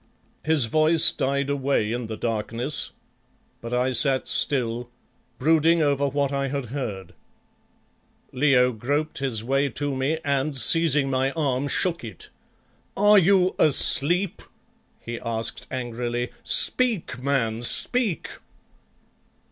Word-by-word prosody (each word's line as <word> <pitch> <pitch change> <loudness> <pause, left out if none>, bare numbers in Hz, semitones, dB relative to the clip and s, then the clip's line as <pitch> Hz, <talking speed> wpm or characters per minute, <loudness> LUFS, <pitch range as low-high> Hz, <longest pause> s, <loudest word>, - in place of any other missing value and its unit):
His 155 -5 +3
voice 155 +6 +4
died 140 +1 -1
away 140 -6 0
in 120 -1 -3
the 110 -1 -6
darkness, 115 +6 -3 0.7
but 115 - -7
I 125 +1 0
sat 135 +1 0
still, 120 -3 -1 0.5
brooding 160 +3 +3
over 140 -1 +1
what 140 0 -1
I 140 0 -1
had 140 -1 -3
heard. 110 -9 -5 1.2
Leo 125 -2 +3
groped 145 +7 -3
his 125 -6 -2
way 135 +3 0
to 140 +3 -3
me 135 +5 -1
and, 140 0 -1
seizing 145 +1 +4
my 130 +1 +1
arm, 140 -4 -1
shook 170 +2 0
it. 110 -7 -10 0.7
"Are 205 +1 +6
you 185 0 +3
asleep?" 170 +5 +1 0.6
he 120 0 -7
asked 115 0 -5
angrily. 120 -1 -4
"Speak, 230 - 0
man, 120 -5 -1
speak!" 215 - 0
135 Hz, 115 wpm, -24 LUFS, 120-150 Hz, 1.2 s, Are